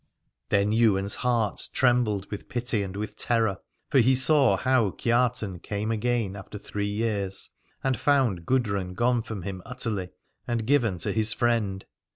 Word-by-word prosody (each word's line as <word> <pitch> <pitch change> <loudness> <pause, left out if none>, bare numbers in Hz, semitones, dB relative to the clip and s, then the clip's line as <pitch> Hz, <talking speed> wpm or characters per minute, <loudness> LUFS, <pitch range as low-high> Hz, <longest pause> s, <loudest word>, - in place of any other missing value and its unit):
Then 100 +1 +2
Ywain's 100 -3 +3
heart 120 -5 0
trembled 120 -6 +2
with 105 - -7
pity 120 -3 -1
and 95 -1 -5
with 105 +1 -5
terror: 110 -5 0 0.3
for 135 - +5
he 130 +2 +5
saw 135 +1 +4
how 130 -5 +2
Kiartan 115 -4 0
came 105 +3 -3
again 115 -3 0
after 100 +1 -8
three 100 0 -4
years, 105 -3 -2 0.3
and 130 -4 0
found 125 - +2
Gudrun 100 -8 0
gone 120 +2 +2
from 110 -5 -6
him 95 0 -5
utterly 110 -7 -3 0.4
and 115 -2 -1
given 120 -8 +2
to 80 - -2
his 110 0 +1
friend. 110 -6 0
110 Hz, 155 wpm, -26 LUFS, 100-120 Hz, 0.4 s, for